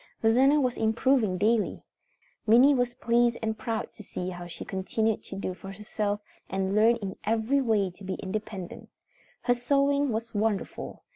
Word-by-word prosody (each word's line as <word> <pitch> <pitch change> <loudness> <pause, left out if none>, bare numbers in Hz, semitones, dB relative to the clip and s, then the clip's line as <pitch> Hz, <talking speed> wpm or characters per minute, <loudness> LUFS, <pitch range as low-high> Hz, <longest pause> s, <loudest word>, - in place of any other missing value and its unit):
Rosanna 260 +6 +5
was 255 -3 0
improving 225 -2 +2
daily. 215 +3 +1 0.6
Minnie 245 +6 +7
was 245 -2 0
pleased 235 0 +2
and 220 0 0
proud 225 +1 -4
to - - -12
see 185 -2 -5
how 175 -1 -7
she 170 - -8
continued 215 +3 -1
to - - -7
do 190 -1 -3
for 195 +1 -9
herself 205 0 -3 0.3
and 190 0 -1
learn 220 +3 +5
in 200 -5 -6
every 225 +6 +1
way 210 -6 +1
to 190 +3 -16
be 190 0 -3
independent. 200 -2 -6 0.5
Her 245 - +4
sewing 280 +2 +2
was 230 +1 -3
wonderful. 210 -1 -2
220 Hz, 160 wpm, -28 LUFS, 195-240 Hz, 0.6 s, Minnie